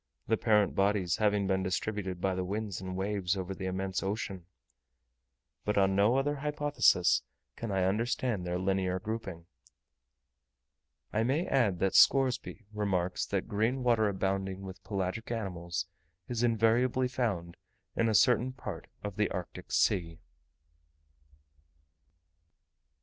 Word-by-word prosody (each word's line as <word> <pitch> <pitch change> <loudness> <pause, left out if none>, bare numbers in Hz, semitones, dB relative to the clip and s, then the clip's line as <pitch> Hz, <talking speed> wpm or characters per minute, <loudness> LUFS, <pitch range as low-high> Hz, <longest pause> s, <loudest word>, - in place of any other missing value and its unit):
the 110 - +3
parent 105 -3 +3
bodies 100 -3 +1
having 105 -2 +2
been 95 0 +1
distributed 95 0 -2
by 95 +1 0
the 95 0 -2
winds 100 0 -3
and 95 0 -5
waves 95 -1 -1
over 95 0 -3
the 95 0 -5
immense 95 0 -2
ocean. 95 -3 -4 1.2
But 105 0 -1
on 95 -1 +3
no 105 +6 +4
other 145 +2 0
hypothesis 145 - +3 0.3
can 115 -3 -5
I 95 -1 +1
understand 110 +1 0
their 90 0 -2
linear 95 0 0
grouping. 100 -5 -5 1.7
I 110 - +2
may 135 +9 +1
add 115 -9 +2
that 95 -1 +2
Scoresby 130 +1 +4
remarks 95 -4 -1
that 100 -2 -2
green 115 +6 0
water 115 -4 +3
abounding 95 0 -2
with 95 0 -9
pelagic 100 +2 -3
animals 90 -6 -3 0.4
is 120 -2 -2
invariably 120 +2 +3
found 100 -10 -2 0.4
in 115 0 +2
a 110 - +1
certain 125 +3 +4
part 130 - -7 0.2
of 105 -1 -5
the 105 - +2
Arctic 90 -2 -6
Sea. 85 -5 +1
100 Hz, 130 wpm, -31 LUFS, 95-115 Hz, 1.7 s, no